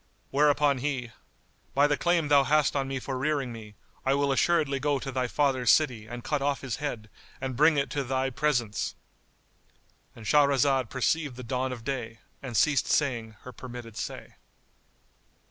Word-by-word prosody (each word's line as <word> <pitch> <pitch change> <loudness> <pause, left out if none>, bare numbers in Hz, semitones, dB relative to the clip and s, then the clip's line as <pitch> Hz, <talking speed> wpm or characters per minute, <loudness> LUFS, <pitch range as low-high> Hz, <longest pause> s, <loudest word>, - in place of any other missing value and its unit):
Whereupon 145 -1 +3
he, 130 -3 -3 0.6
"By 140 +1 +5
the 145 0 +2
claim 170 0 +1
thou 140 -1 +6
hast 150 +1 +2
on 135 -1 0
me 135 0 -3
for 130 0 -4
rearing 140 -3 -1
me, 105 -2 -11 0.3
I 135 +1 +2
will 140 0 +1
assuredly 140 -1 +2
go 145 +1 +1
to 135 0 -5
thy 130 -1 -1
father's 130 -3 +1
city 125 -8 +3
and 120 +1 -7
cut 145 +1 -1
off 140 -1 0
his 130 -4 -4
head 125 -7 -4 0.3
and 130 -1 -4
bring 150 +3 +4
it 140 - +3
into 140 +1 -3
thy 130 +1 -1
presence!"——And 120 -4 -5
Shahrazad 140 -1 +3
perceived 140 +1 0
the 125 - -8
dawn 130 +2 -2
of 120 -3 -7
day 115 -3 -4 0.2
and 120 -5 -4
ceased 145 +2 +3
saying 120 -7 0
her 130 - -9
permitted 120 -2 -9
say. - - -7
135 Hz, 165 wpm, -28 LUFS, 125-145 Hz, 0.6 s, thou